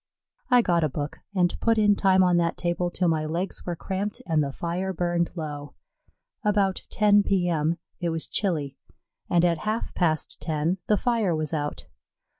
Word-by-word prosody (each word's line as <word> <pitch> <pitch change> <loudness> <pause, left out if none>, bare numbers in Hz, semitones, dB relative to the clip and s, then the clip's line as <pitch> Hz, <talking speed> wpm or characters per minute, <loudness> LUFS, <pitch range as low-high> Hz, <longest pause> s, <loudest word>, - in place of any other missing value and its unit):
I 250 -2 +5
got 170 -4 +2
a 155 - +2
book 145 +2 -5 0.2
and 175 -2 +2
put 225 -1 +2
in 205 -1 +4
time 190 -1 +4
on 180 -1 +3
that 170 -1 +1
table 175 0 -1
till 180 +1 0
my 160 -2 +1
legs 175 +5 -3
were 175 - -1
cramped 195 +4 -4
and 160 -4 +2
the 140 - -3
fire 175 +6 -3
burned 175 -1 0
low. 145 -4 -6 0.7
About 200 -2 +1
10 205 -1 +4
P.M. 170 -5 +1 0.2
it 175 - -1
was 165 -1 -2
chilly, 150 -9 -1 0.5
and 175 0 +4
at 170 -2 +1
half 215 +5 -2
past 160 -4 0
ten 160 +3 -1
the 210 - +3
fire 225 -8 +1
was 155 0 -2
out. 145 -1 -3
175 Hz, 175 wpm, -26 LUFS, 160-195 Hz, 0.7 s, I